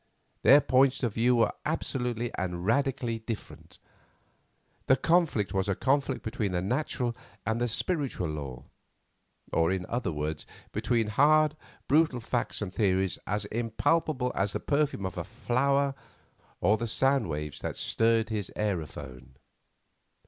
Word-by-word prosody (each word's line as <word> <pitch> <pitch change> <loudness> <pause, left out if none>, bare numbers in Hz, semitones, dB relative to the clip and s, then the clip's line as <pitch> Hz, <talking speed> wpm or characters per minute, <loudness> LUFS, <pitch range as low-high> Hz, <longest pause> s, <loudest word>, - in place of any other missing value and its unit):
Their 145 +2 +7
points 130 +2 +3
of 115 -4 0
view 120 +3 +3
were 115 -2 +3
absolutely 125 -6 -2
and 90 -1 -3
radically 120 -1 0
different. 110 -1 -8 1.1
The 130 - +6
conflict 155 - +2
was 95 +1 0
a 100 - +1
conflict 135 +2 0
between 110 -4 -2
the 90 - 0
natural 125 +1 -1 0.3
and 115 +1 0
the 120 - +2
spiritual 135 - -1
law; 70 -5 -6 0.9
or, 85 0 +3
in 95 -1 -1
other 120 -5 -2
words, 75 0 -4 0.2
between 110 +1 +1
hard, 150 +7 +4 0.3
brutal 150 -3 +3
facts 120 -1 -2
and 95 -3 -6
theories 95 -3 +1
as 105 0 -1
impalpable 125 +5 0
as 95 +1 -1
the - - -1
perfume 140 -8 0
of 95 - -4
a - - -2
flower, 140 +3 +1 0.7
or 105 +5 +4
the 115 - -3
sound 135 -1 +2
waves 75 -1 -4
that - - -4
stirred 115 -1 +2
his 105 -4 -3
aerophone. 70 -10 -4
115 Hz, 140 wpm, -29 LUFS, 95-135 Hz, 1.1 s, Their